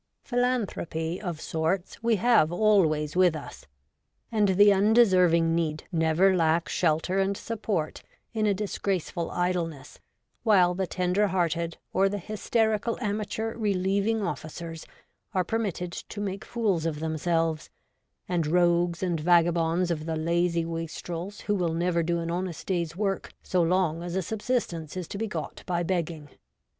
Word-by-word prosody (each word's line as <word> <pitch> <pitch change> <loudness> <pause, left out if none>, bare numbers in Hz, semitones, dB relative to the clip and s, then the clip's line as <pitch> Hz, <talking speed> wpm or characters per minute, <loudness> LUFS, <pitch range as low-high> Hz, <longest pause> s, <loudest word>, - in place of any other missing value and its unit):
Philanthropy, 215 - -1
of 175 -6 -4
sorts, 165 +6 -2
we 230 0 +3
have 215 -7 +4
always 175 -7 +2
with 180 -3 +4
us, 155 - -9 0.6
and 215 -2 +3
the 205 +2 +6
undeserving 185 -6 +4
need 155 -2 -1
never 165 +3 +3
lack 165 -1 +2
shelter 170 +3 +1
and 195 +1 +1
support 210 -8 -3 0.3
in 215 -2 +1
a 205 - +3
disgraceful 190 -4 -2
idleness 175 -5 -2 0.4
while 185 -6 +4
the 190 +1 -2
tender 185 +4 +1
hearted 170 -3 -1 0.2
or 195 +1 +3
the 205 - -2
hysterical 215 +2 0
amateur 215 0 -2
relieving 200 +1 0
ofificers 165 -1 -5 0.5
are 185 - +3
permitted 185 -4 -2
to 205 - -7
make 200 0 -3
fools 200 -9 0
of 150 -2 -3
themselves, 160 0 -1 0.6
and 170 -4 0
rogues 175 +1 +2
and 175 -3 0
vagabonds 170 +1 +3
of 155 -1 -3
the 160 - -1
lazy 170 +1 +1
wastrels 165 +3 -5
who 205 - -1
will 175 -5 0
never 170 0 +1
do 170 +1 0
an 170 0 -3
honest 175 -2 -4
day's 170 -3 -1
work 195 0 -2
so 180 - +1
long 170 -1 +1
as 175 0 -5
a 190 - 0
sub 220 +5 -4
sistence 180 - -2
is 180 -3 -4
to 200 - -6
be 225 - -1
got 210 - -5
by 175 -1 0
begging. 165 -4 -2
180 Hz, 150 wpm, -27 LUFS, 165-200 Hz, 0.6 s, the